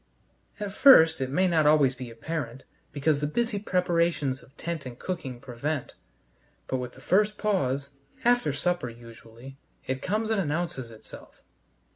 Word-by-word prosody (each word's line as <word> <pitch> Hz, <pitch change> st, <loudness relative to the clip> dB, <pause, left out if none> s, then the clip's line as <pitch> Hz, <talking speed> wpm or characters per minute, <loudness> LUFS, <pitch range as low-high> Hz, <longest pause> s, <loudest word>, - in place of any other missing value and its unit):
At 205 Hz, -2 st, -4 dB
first 165 Hz, -, +7 dB
it 130 Hz, -, -1 dB
may 185 Hz, +7 st, +2 dB
not 160 Hz, -4 st, +3 dB
always 145 Hz, -3 st, +5 dB
be 125 Hz, -1 st, -8 dB
apparent, 130 Hz, +1 st, -5 dB, 0.3 s
because 145 Hz, 0 st, +1 dB
the 145 Hz, -, 0 dB
busy 230 Hz, +6 st, -1 dB
preparations 170 Hz, -8 st, 0 dB
of 135 Hz, -, -21 dB
tent 170 Hz, -3 st, -4 dB
and 120 Hz, -2 st, -9 dB
cooking 135 Hz, -9 st, -5 dB
prevent, 130 Hz, +4 st, -4 dB, 0.7 s
but 130 Hz, -, -2 dB
with 125 Hz, -1 st, -5 dB
the -, -, -15 dB
first 210 Hz, +2 st, +2 dB
pause 140 Hz, -9 st, 0 dB, 0.3 s
after 245 Hz, -10 st, +3 dB
supper 175 Hz, -1 st, -1 dB
usually 115 Hz, +3 st, -13 dB, 0.3 s
it 130 Hz, 0 st, -3 dB
comes 215 Hz, +3 st, -1 dB
and 215 Hz, -3 st, +2 dB
announces 155 Hz, -6 st, -3 dB
itself. 110 Hz, -1 st, -14 dB
150 Hz, 150 wpm, -27 LUFS, 130-180 Hz, 0.7 s, first